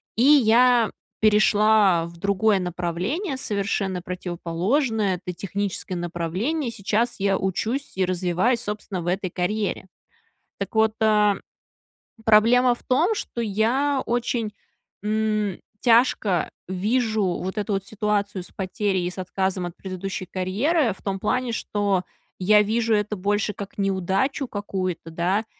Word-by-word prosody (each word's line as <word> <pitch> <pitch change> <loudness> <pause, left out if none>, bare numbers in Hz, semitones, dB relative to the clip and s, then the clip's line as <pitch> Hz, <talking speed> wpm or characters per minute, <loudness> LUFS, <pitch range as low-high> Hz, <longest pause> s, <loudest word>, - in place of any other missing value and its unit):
И 230 - +2
я 245 -4 +5 0.3
перешла 210 -4 +4
в 170 0 -11
другое 200 +2 +2
направление, 180 - -2
совершенно 200 -5 -2
противоположное. 185 - -1
Это 180 - -3
техническое 195 0 -3
направление. 180 - -2
Сейчас 225 +2 -1
я 195 0 +2
учусь 220 +7 -2
и 190 - +2
развиваюсь, 185 +6 +1
собственно, 210 -4 -4
в 170 - -7
этой 185 +1 -1
карьере. 200 +2 -2 0.7
Так - - -5
вот, 220 0 +3
э, 210 -2 +4 0.9
проблема 235 +3 +5
в 240 - -12
том, 315 +11 +2
что 405 - -5
я 240 +7 +1
очень, 235 -2 -1 0.5
м, 215 -2 0 0.2
тяжко 225 -7 +3 0.2
вижу 215 +4 0
вот 190 +2 -2
эту 205 0 -2
вот 195 0 -2
ситуацию 205 -2 -1
с - - -9
потерей 190 -1 -1
и 175 - -2
с - - -12
отказом 185 0 -1
от 175 - -9
предыдущей 185 0 -5
карьеры 220 - 0
в - - -21
том 195 -1 -2
плане, 250 +4 0
что 205 -4 0 0.4
я 210 +3 +5
вижу 225 +2 +1
это 210 0 -1
больше 205 +2 0
как 200 -1 -8
неудачу 195 +8 0
какую-то, 185 -6 -4
да. 185 +6 0
205 Hz, 130 wpm, -24 LUFS, 185-225 Hz, 0.9 s, я